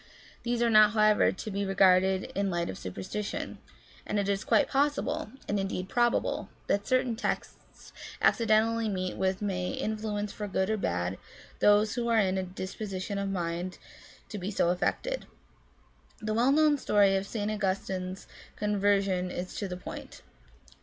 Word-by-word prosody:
These 240 0 0
are 235 - +3
not, 215 -1 +7
however, 215 -1 +4
to 215 - -6
be 200 +1 -1
regarded 190 -1 +4
in 200 +1 0
the - - -1
light 170 -1 -1
of 95 - -9
superstition, 95 - -5 0.4
and 210 - -2
it 200 -1 0
is 200 -1 0
quite 290 - +3
possible, 285 -2 0 0.2
and 205 - 0
indeed 190 -1 -3
probable, 240 0 +1 0.2
that 200 0 0
certain 255 -3 +2
texts 225 - -5 0.3
accidentally 225 0 +3
met 185 -2 -2
with 190 +1 -1
may 180 -3 -1
influence 210 -1 -3
for 210 - -5
good 190 +1 0
or 220 - +1
bad 90 - -2 0.4
those 205 +1 +4
who 240 -1 -2
are 230 -1 +3
in 190 -3 +2
a - - 0
disposition 190 +1 -5
of 200 0 -2
mind 175 -1 -3 0.5
to 210 - -5
be 185 +2 -3
so 190 -4 +1
affected. - - -1 0.9
The 215 -1 -2
well 240 +4 +3
known 300 0 +4
story 200 -5 +4
of 195 +1 -1
St. 210 -1 -2
Augustine's 190 -2 -2 0.3
conver 205 -1 +2
sion 185 -2 -1
is 180 0 -5
to 200 - -2
the 180 -1 -5
point. - - -9
200 Hz, 165 wpm, -29 LUFS, 185-215 Hz, 0.9 s, not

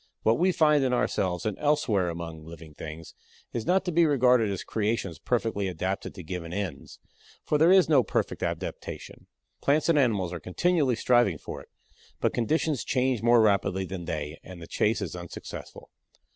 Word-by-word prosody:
What 115 +4 +3
we 185 +2 +4
find 150 -4 +3
in 130 -1 +1
ourselves 90 -7 0
and 105 -2 -2
elsewhere 130 -12 +1
among 85 -2 -6
living 80 -1 -11
things 80 +2 -9 0.4
is 115 -2 -3
not 190 +1 +2
to 180 - -1
be 170 +1 +4
regarded 125 -6 +4
as 100 -2 -3
creations 105 -7 -2
perfectly 115 -4 -1
adapted 95 +2 -3
to 90 - -8
given 85 0 -6
ends, 90 -6 -5 0.5
for 150 - 0
there 165 +3 +6
is 190 -1 +6
no 150 -4 +5
perfect 110 - -2
adaptation. - - -5 0.3
Plants 150 +4 +2
and 160 -3 +4
animals 100 -9 +1
are 85 - -4
continually 140 - +1
striving 120 -7 +3
for - - -8
it, - - -18 0.5
but - - +1
conditions 150 +3 0
change 130 -2 0
more 120 0 +5
rapidly 100 -3 +2
than 90 -2 -6
they 75 -1 -4
and 90 -1 -10
the 85 - -9
chase 105 +6 0
is - - -5
unsuccessful. 85 -1 -9
110 Hz, 175 wpm, -27 LUFS, 90-135 Hz, 0.5 s, there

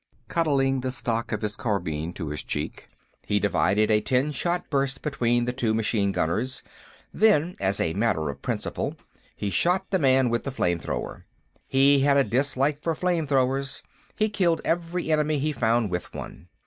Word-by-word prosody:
Cuddling 140 -5 +1
the 130 0 -2
stock 115 -2 -2
of - - -2
his 105 0 -1
carbine 85 -8 -2
to 80 -5 -5
his 75 - -3
cheek, - - -5 0.4
he 105 - +2
divided 105 +1 +2
a 105 0 +4
ten 130 +6 +1
shot 175 +4 -1
burst 135 -1 0
between 120 -5 +1
the 125 - -2
two 115 -4 0
machine 105 -2 +1
gunners, 115 +10 -1 0.5
then, 180 -6 +3
as 95 +1 0
a 80 - 0
matter 100 -7 0
of - - -13
principle, - - -3 0.4
he 100 - -3
shot 180 - +1
the 190 - +2
man 130 -3 +4
with 120 - 0
the - - -3
flame 85 -9 0
thrower. - - -5 0.4
He 140 +1 +4
had 140 +1 +4
a 140 - +5
dislike 140 +3 0
for 165 0 -1
flame 175 -2 0
throwers; 135 0 0 0.3
he 215 - +2
killed 180 -6 +1
every 170 0 -1
enemy 150 0 +2
he 150 +2 0
found 115 -5 +1
with 90 -1 -3
one. 80 - -8
130 Hz, 175 wpm, -25 LUFS, 110-150 Hz, 0.5 s, a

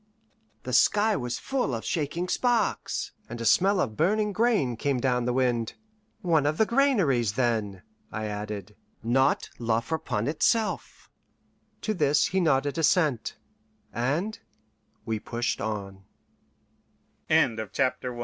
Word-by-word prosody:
The 125 - -5
sky 210 - +4
was 125 -5 -3
full 255 - -1
of 115 - -6
shaking 165 +3 -2
sparks, 235 +1 0 0.2
and 120 +1 -6
a 115 - -4
smell 195 - +4
of 110 -11 -1
burning 210 - +1
grain 210 - +2
came 135 +2 -1
down 125 -1 +1
the 125 - +1
wind. 120 -3 0 0.5
"One 160 -5 +3
of 155 +1 0
the 220 - +4
granaries, 195 - +2
then," 110 -6 -1 0.3
I 110 0 -4
added, 105 -1 -5 0.3
"not 130 +4 +2
La 115 -1 +1
Friponne 115 -4 -2
itself?" 215 +9 -1 0.7
To 215 - -1
this 150 -5 +3
he 190 - 0
nodded 145 -2 +1
assent, 155 - +1 0.6
an 145 - -1
140 Hz, 110 wpm, -27 LUFS, 120-190 Hz, 0.7 s, sky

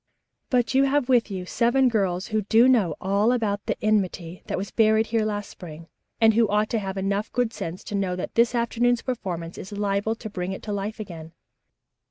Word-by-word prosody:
But 245 -2 +1
you 270 +1 +4
have 275 -1 +1
with 245 -3 +3
you 185 -2 -5
seven 240 +6 +2
girls 195 -5 0
who 215 0 0
do 225 +4 +4
know 210 - +3
all 200 +4 +2
about 210 -5 -1
the - - -1
enmity 185 -5 0
that - - -2
was 195 +2 -5
buried 220 0 +3
here 225 0 0
last 205 -1 -3
spring, 165 -2 -11 0.3
and 225 -1 +5
who 225 0 +3
ought 210 +1 +1
to 230 - +1
have 195 -1 -5
enough 200 +2 -1
good 245 -2 0
sense 170 -2 -6
to - - -8
know 195 -3 -1
that 180 - -5
this 235 +1 +3
afternoon's 240 0 +1
performance 180 -9 -4
is 195 - -9
liable 205 +1 -1
to 225 - -8
bring 185 -2 -4
it - - -8
to 210 - -4
life 205 +2 -4
again. 165 -5 -8
210 Hz, 210 wpm, -24 LUFS, 190-230 Hz, 0.3 s, and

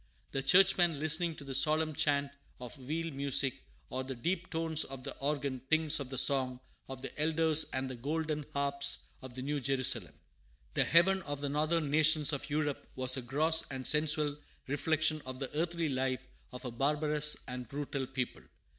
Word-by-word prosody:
The 135 - -1
Churchman, 175 0 +5
listening 160 +2 +2
to 145 - -10
the 135 -1 -6
solemn 155 +3 +2
chant 140 -1 +1 0.3
of 125 +2 -8
weal 160 +5 -4
music 140 - +1 0.3
or 130 0 -3
the 130 0 -6
deep 175 +8 -2
tones 160 -2 0
of 135 -1 -9
the 140 - -6
organ, 140 -2 -2
thinks 160 -1 +3
of 135 -3 -6
the 130 - -5
song 130 -2 +2 0.3
of 130 -1 -8
the - - -6
elders 160 0 +3
and 130 0 -2
the 130 - -5
golden 150 +4 -2
harps 140 0 0 0.2
of 130 -2 -10
the 130 - -5
New 145 +1 -1
Jerusalem. 135 -1 0 0.6
The - - +2
heaven 190 +4 +4
of 145 -4 -5
the 145 0 -3
northern 155 +1 0
nations 155 0 +4
of 145 - -4
Europe 150 -1 -1
was 130 0 +2
a 130 - -3
gross 155 +6 +3
and 130 -2 -5
sensual 150 -1 +3 0.3
reflection 155 +2 +1
of 130 0 -7
the 135 +2 -6
earthly 170 0 -1
life 130 -1 -1 0.3
of 125 +1 -9
a 125 - -4
barbarous 150 +3 +1
and 125 -2 -6
brutal 140 -1 -4
people. 125 -1 -4
145 Hz, 180 wpm, -32 LUFS, 130-155 Hz, 0.6 s, Churchman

